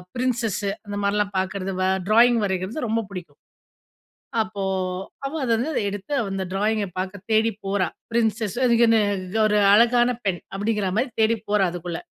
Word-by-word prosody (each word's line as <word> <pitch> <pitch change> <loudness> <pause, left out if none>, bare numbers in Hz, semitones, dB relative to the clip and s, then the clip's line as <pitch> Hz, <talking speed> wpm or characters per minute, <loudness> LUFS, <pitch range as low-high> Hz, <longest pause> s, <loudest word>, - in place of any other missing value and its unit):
Princess 240 -5 -1 0.3
அந்த 205 - -4
மாரிலாம் 200 0 0
பார்க்கறது. 190 0 -3
வ - - +2 0.2
ட்ராயிங் 235 +2 +5
வரைறது 190 +8 -2
ரொம்ப 225 +1 0
பிடிக்கும். 175 -6 -9 1.0
அப்போ 215 -2 -4 0.6
அவ 275 - -4
அத 240 - 0
வந்து 270 +1 -1
எடுத்து 205 +8 -6 0.2
அந்த 195 -1 -2
ட்ராயிங்க 210 +1 0
பார்க்க 190 +1 -5
தேடி 220 +1 +3 0.2
போறா. 195 -2 +1 0.2
பிரின்சஸ்ன்னு 225 +1 0
அதுக்குனு 230 -2 +4 0.4
ஒரு 210 0 +3
அழகான 240 +3 +5 0.2
பெண்! 185 -3 -1
அப்படிங்கிற 205 -1 0
மாரி 260 - 0
தேடி 225 +1 +3
போறா 205 -2 +3
அதுக்குள்ள. 175 -1 -5
210 Hz, 145 wpm, -23 LUFS, 195-230 Hz, 1.0 s, ட்ராயிங்